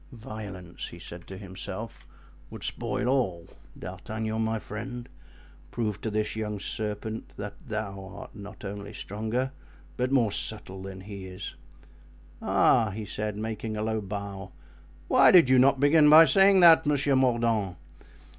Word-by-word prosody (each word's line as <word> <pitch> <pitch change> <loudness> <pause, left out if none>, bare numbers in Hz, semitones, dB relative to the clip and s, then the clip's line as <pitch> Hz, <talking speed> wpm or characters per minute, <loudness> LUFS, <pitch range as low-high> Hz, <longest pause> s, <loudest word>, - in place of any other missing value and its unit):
"Violence," 105 -6 -8
he - - -11
said 85 0 -10
to 95 - -8
himself, 100 +3 -8 0.4
"would - - -9
spoil - - -2
all; 105 -11 0 0.3
D'Artagnan, 110 0 -4
my 110 0 0
friend, 120 +4 -7 0.6
prove 105 -2 -3
to 110 - -2
this 105 0 -1
young 105 -2 -3
serpent 110 +1 -5
that 105 0 -7
thou 105 -3 -4
art 100 - -10
not 105 0 -10
only 100 +1 -6
stronger, 110 +7 -3 0.5
but 125 +1 0
more 120 -6 +3
subtle 95 -3 -4
than 95 0 -8
he 100 -1 -8
is." 95 +1 -7 0.9
"Ah!" 110 -2 +3
he 105 +2 -6
said, 105 +1 -4
making 110 0 -4
a 105 - -2
low 110 0 -1
bow, 100 -1 -6 0.6
"why - - +6
did 170 -8 +7
you 130 - +6
not 135 +1 +5
begin 150 +2 +6
by 160 +2 +10
saying 195 +1 +6
that, 165 -3 +7
Monsieur 145 -1 +2
Mordaunt? 115 -7 +1
110 Hz, 145 wpm, -27 LUFS, 100-120 Hz, 0.9 s, by